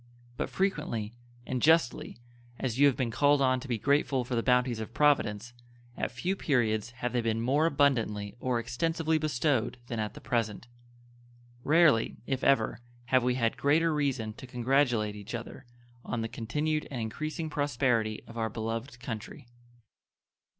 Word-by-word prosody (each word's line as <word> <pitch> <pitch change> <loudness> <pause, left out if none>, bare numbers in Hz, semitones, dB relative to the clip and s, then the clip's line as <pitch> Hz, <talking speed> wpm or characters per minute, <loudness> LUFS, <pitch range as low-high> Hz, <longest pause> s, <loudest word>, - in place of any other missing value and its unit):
But - - -3
frequently 150 - -1 0.3
and 130 -1 -2
justly 160 -8 +2 0.4
as 125 -1 -3
you 145 - +7
have 135 - +2
been 125 -3 -1
called 145 +4 +3
on 130 -1 +3
to 135 - -9
be 120 -3 -1
grateful 140 0 +1
for 125 - -5
the 115 - +2
bounties 125 -1 +2
of 110 +2 -7
Providence, 120 -6 +2 0.4
at - - -2
few 175 +10 -2
periods 115 - +1
have 125 0 -4
they 120 - +1
been 115 -1 0
more 140 +7 +2
abundantly 115 -9 +1
or 125 -1 0
extensively 160 +7 0
bestowed 130 -5 0
than 115 -1 -4
at 105 -1 -3
the - - -8
present; 115 -3 -2 1.0
rarely, 155 -7 +4
if 135 -1 -2
ever, 135 -5 +2 0.3
have 130 -1 +4
we 125 +1 +1
had 115 -3 0
greater 160 +3 +3
reason 135 -7 -1
to 130 - -11
congratulate 120 -4 +1
each 105 +3 -7
other 120 +2 -8 0.4
on 120 - -3
the 115 - -2
continued 150 +8 -2
and 130 - -5
increasing 155 +9 -4
prosperity 125 -7 0
of 115 0 -8
our 110 0 0
beloved 115 +3 -4
country. 115 -1 -7
125 Hz, 160 wpm, -29 LUFS, 115-145 Hz, 1.0 s, you